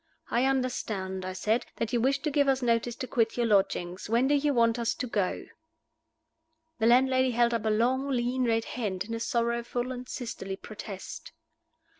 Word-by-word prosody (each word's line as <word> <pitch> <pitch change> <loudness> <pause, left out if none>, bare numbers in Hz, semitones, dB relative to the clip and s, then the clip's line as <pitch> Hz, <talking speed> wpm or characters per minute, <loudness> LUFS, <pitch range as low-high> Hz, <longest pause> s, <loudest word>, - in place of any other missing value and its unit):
"I 240 +2 +2
understand," 215 -8 -1
I 185 - -4
said, 215 +5 0
"that 230 0 -3
you 240 - +2
wish 270 +3 +1
to 305 - 0
give 285 0 +3
us 265 -1 +2
notice 235 0 +1
to 255 - -5
quit 225 -2 +1
your 240 - +2
lodgings. 190 -3 +1
When 235 +4 +3
do 290 - +3
you 290 0 +2
want 230 -2 +3
us 235 -1 0
to 255 - -3
go?" 205 -6 -1 1.3
The 225 - +3
landlady 260 +1 +4
held 240 0 +2
up 225 -2 -1
a - - +2
long, 250 +6 +1
lean, 250 0 0
red 225 -1 +1
hand, 205 -7 -3
in 230 - -6
a 230 - -2
sorrowful 235 +1 -1
and 250 0 -7
sisterly 195 -5 -5
protest. 200 -1 -8
235 Hz, 185 wpm, -28 LUFS, 220-255 Hz, 1.3 s, landlady